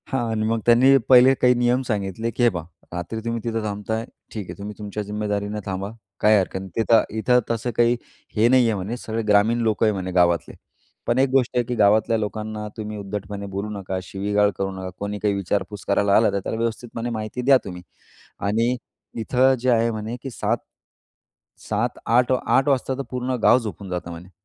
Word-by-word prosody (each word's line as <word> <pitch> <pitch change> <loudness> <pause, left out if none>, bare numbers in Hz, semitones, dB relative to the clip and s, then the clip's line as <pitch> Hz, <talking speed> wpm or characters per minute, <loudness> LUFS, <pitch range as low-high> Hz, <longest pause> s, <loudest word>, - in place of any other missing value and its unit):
हां 120 -3 -1
आणि 110 -1 -1
मग 115 +1 +1
त्यांनी 130 +3 +6
पहिले 130 +1 +8
काही 125 0 +6
नियम 120 +1 +2
सांगितले, 105 +1 -2
की 120 - -1
हे 120 - +6
पहा, 85 -6 -5 0.3
"रात्री 90 +6 -4
तुम्ही 115 0 -2
तिथं 115 -1 -2
थांबताय, 110 +2 -3 0.3
ठीक 105 -3 -5
आहे. - - -7
तुम्ही 105 +1 -6
तुमच्या 105 0 -5
जिम्मेदारीने 105 0 -3
थांबा. 95 +1 -4 0.3
काही 105 0 +5
हरकत 95 -1 -1
नाही 95 0 -8
तिथं 115 0 +4 0.2
इथं 125 +3 +4
तसं 115 +1 -2
काही 120 0 +4 0.4
हे 110 +1 +4
नाही 130 0 +5
आहे" 110 - 0
म्हणे, 100 +5 -4
सगळे 115 -1 -3
ग्रामीण 105 +3 +4
लोकं 110 0 +2
आहेत 110 - +3
म्हणे 95 -2 -4
गावातले. 85 -2 +2 0.5
पण 120 - +2
एक 135 0 +3
गोष्ट 130 -2 +1
आहे 120 - +3
की 125 - -3
गावातल्या 110 +2 +3
लोकांना 105 0 -4
तुम्ही 105 -1 -5
उद्धटपणे 100 0 -5
बोलू 100 +2 -3
नका, 95 -1 -4
शिवीगाळ 100 +2 +1
करू 95 0 -2
नका. 95 -1 -6
कोणी 100 0 -4
काही 105 -1 +1
विचारपूस 100 +1 -3
करायला 100 0 +3
आला 110 - +4
तर, 100 - -1
त्याला 100 - -4
व्यवस्थितपणे 115 +1 -3
माहिती 110 +1 -4
द्या 135 +2 +6
तुम्ही 90 -2 -7 0.7
आणि 115 +4 +1 0.4
इथं 130 +4 +3
जे 130 +2 0
आहे 115 -1 +3
म्हणे, 110 +1 -4
की 135 - -5
7-7 115 -1 -6
8-8 125 +3 +3
वाजता 135 -1 +1
तर - - -2
पूर्ण 125 0 -2
गाव - - +7
झोपून 105 -4 -7
जातं 90 -1 -4
म्हणे. 85 +2 -10
110 Hz, 190 wpm, -23 LUFS, 100-120 Hz, 0.7 s, पहिले